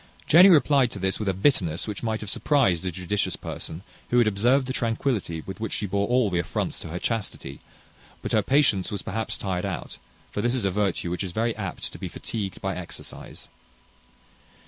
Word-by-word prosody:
Jenny 180 +5 +8
replied 145 -6 +5
to 105 - -7
this 95 0 -1
with 105 -2 -1
a - - +1
bitterness 95 - +1
which 105 -3 -4
might 110 -2 -1
have 105 - -4
surprized 100 - +2
a 90 - -2
judicious 90 +3 -1
person, 80 +3 -6 0.3
who 120 - +2
had 120 - +6
observed 120 +6 +3
the 130 - -3
tranquillity 115 - -1
with 95 - -7
which 110 -2 -3
she 105 - -1
bore 100 +1 0
all 125 -4 +2
the 90 - +1
affronts 80 - -2
to - - -7
her 80 +2 -4
chastity; 100 - -3 0.6
but - - -3
her 110 - +4
patience 110 -5 +2
was 100 -2 -4
perhaps 110 +3 -2
tired 95 -2 -2
out, 95 -6 -5 0.3
for 105 - -2
this 120 +3 +2
is 120 -6 0
a 95 - +2
virtue 95 -3 0
which 90 - -2
is 90 -3 -5
very 115 +2 0
apt 100 -5 -4
to - - -9
be - - -4
fatigued 100 -4 -5
by 95 -1 -2
exercise. 90 -2 -8
105 Hz, 205 wpm, -26 LUFS, 95-120 Hz, 0.6 s, Jenny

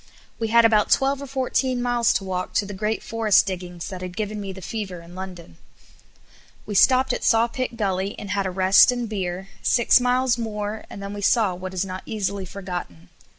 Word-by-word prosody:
We 225 - -1
had 230 +1 +5
about 215 -2 +4
twelve 275 +1 +2
or 280 - -6
fourteen 260 -1 0
miles 240 -1 +2
to - - -1
walk 185 -1 -4
to 205 - +1
the 205 - -7
great 210 +3 -2
forest 225 -3 +3
diggings 180 -2 -5
that 185 -1 -7
had 180 +1 -7
given 210 -1 -3
me 195 -1 -5
the 190 - -9
fever 195 -3 -5
in 170 +1 -14
London. 180 - -9 1.1
We 210 - -5
stopped 255 +5 +4
at - - -4
Sawpit 235 +1 +1
Gully 195 -2 -1
and 200 - -6
had 200 -1 0
a - - -1
rest 190 +5 +5
and 245 -1 -3
beer, 190 -2 -4
six 235 +1 +4
miles 250 0 +1
more 210 -1 -4
and 200 - -8
then 200 +1 -5
we 205 - -6
saw 210 -2 +3
what 185 +1 -7
is 185 +1 0
not 185 0 -6
easily 200 -3 -3
forgotten. 175 - -7
205 Hz, 200 wpm, -23 LUFS, 185-230 Hz, 1.1 s, had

